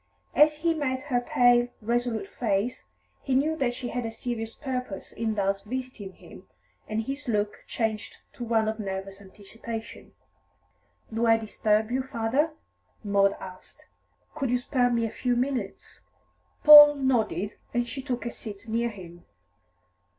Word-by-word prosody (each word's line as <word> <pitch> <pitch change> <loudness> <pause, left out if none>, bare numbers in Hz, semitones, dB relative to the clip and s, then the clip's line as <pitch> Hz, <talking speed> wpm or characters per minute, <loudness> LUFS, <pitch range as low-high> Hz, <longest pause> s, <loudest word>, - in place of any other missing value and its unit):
As 300 +2 +5
he 330 +2 +1
met 260 -4 -2
her 255 -4 0
pale, 245 0 +4
resolute 240 - -1
face, 225 - -2 0.4
he 265 - -1
knew 305 +4 +2
that 245 -5 0
she 245 -1 -5
had 245 0 -3
a 225 - -3
serious 225 -1 -5
purpose 250 -8 -5
in 220 -1 -2
thus 195 -1 0
visiting 245 -4 -6
him, - - -15 0.4
and 215 +1 -2
his 275 +4 -6
look 210 -2 -1
changed 220 -2 -3 0.2
to 245 - -7
one 225 -2 +1
of 220 +1 -2
nervous 195 -1 -5
anticipation. 220 +3 -9 1.0
"Do 230 +1 +1
I 225 0 +6
disturb 215 0 0
you, 260 +1 +1
father?" 260 +5 0 0.5
Maud 200 -1 +3
asked. 185 -1 -12 0.5
"Could 270 -3 -2
you 250 - +2
spare 245 0 +1
me 235 -1 +1
a 220 - -3
few 250 -1 -1
minutes?" 245 -5 -3 0.6
Paul 295 -1 +11
nodded, 235 -6 0 0.2
and 240 0 0
she 270 - -5
took 250 -3 -4
a 235 - -2
seat 210 -1 -9
near 230 +2 0
him. 175 -5 -12
235 Hz, 150 wpm, -27 LUFS, 215-255 Hz, 1.0 s, Paul